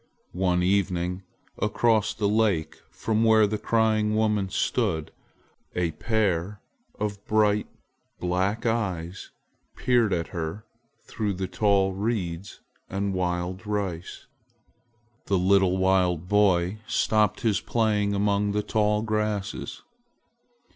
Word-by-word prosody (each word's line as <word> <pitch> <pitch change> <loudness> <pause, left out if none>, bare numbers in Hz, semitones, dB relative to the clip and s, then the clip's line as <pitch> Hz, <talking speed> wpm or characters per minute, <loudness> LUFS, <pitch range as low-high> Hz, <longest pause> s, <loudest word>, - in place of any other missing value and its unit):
One 90 -1 +1
evening, 90 -1 0 0.4
across 110 0 +2
the 105 - 0
lake 105 -6 +1
from 110 0 -1
where 110 -1 +5
the 105 +1 -2
crying 110 -2 +1
woman 105 -3 +1
stood, 95 -6 -1 0.6
a 90 -2 0
pair 100 0 -1 0.4
of 105 -1 -3
bright 105 -1 +2 0.5
black 95 +5 -1
eyes 95 -7 -2 0.5
peered 120 -4 +2
at 85 -2 -1
her 85 +5 -5 0.4
through 105 -3 -2
the 95 0 -3
tall 100 -2 +2
reeds 95 -3 -3 0.3
and 100 0 -2
wild 90 +2 -2
rice. 95 -5 -4 1.0
A 100 - +3
little 95 0 +3
wild 90 -3 +2
boy 95 -1 +2
stopped 110 -3 +1
his 110 -5 +1
play 110 -3 +1
among 100 0 +1
the 105 0 0
tall 105 0 +1
grasses. 105 -2 -3
100 Hz, 110 wpm, -26 LUFS, 90-110 Hz, 1.0 s, where